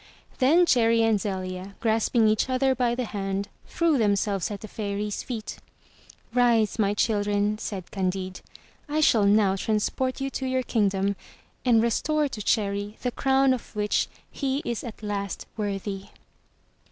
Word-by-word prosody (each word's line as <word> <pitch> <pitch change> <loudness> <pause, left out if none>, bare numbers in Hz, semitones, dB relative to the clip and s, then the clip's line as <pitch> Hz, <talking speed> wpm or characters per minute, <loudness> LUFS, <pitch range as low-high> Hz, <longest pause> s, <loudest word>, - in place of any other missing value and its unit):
Then 315 +7 +5
Cherry 230 -5 +4
and 220 -3 +2
Zelia, 185 -1 -4
grasping 225 0 +2
each 215 +4 +2
other 260 +1 +2
by 240 -2 +1
the 250 0 -2
hand, 195 -1 -3 0.2
threw 330 -5 +1
themselves 200 -3 +1
at 205 -2 -6
the 215 - -7
Fairy's 205 -1 -3
feet. 225 -4 -6 0.8
"Rise, 235 -3 +3
my 205 -1 +2
children," 205 -1 +1
said 190 -5 -6
Candide, 185 -1 -2 0.5
"I 300 +1 0
shall 225 -9 +4
now 200 -1 +4
transport 220 +6 -1
you 270 0 -2
to 265 - -3
your 260 0 0
kingdom 200 -4 +1 0.5
and 230 -3 +4
restore 300 +6 +1
to 220 - -6
Cherry 205 0 0
the 250 - 0
crown 270 +1 +3
of 245 -3 -7
which 210 0 +1 0.2
he 275 0 -2
is 235 -2 -3
at 225 -2 -8
last 200 -2 -3
worthy." 200 -2 -3
215 Hz, 150 wpm, -26 LUFS, 200-250 Hz, 0.8 s, Then